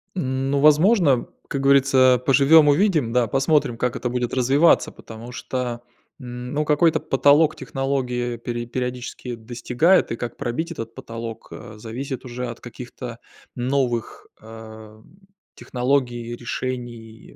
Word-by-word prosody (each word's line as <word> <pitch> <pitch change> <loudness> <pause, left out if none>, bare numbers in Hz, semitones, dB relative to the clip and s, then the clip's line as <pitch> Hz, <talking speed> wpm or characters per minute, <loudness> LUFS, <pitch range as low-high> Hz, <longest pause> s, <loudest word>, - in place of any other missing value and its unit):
Ну, 135 -3 -1
возможно, 155 - +4 0.2
как 135 - -3
говорится, 135 -2 +4
поживём-увидим. 145 - +4
Да, 125 -2 +2
посмотрим, 135 0 +1
как 125 +1 -1
это 120 - -3
будет 125 -1 -2
развиваться, 135 +6 +3
потому 115 +2 -11
что, 125 -2 -4 0.4
м, 125 0 -7
ну, 150 +1 0
какой-то 160 +2 +3
потолок 145 +3 +3
технологии 130 -3 -2
пере 120 0 -5
периодически 125 0 -5
достигает, 125 +10 +1
и - - -1
как 120 -1 -5
пробить 140 +6 -3
этот 115 -7 -7
потолок, 115 -1 -8
э, 115 -3 -10
зависит 125 +5 -6
уже 125 0 -5
от 120 - -8
каких-то 120 0 -9 0.4
новых, 125 -2 -2
э, 110 -1 -12 0.5
технологий, 125 -2 -1
решений, 120 -2 -6
125 Hz, 120 wpm, -22 LUFS, 120-140 Hz, 0.5 s, возможно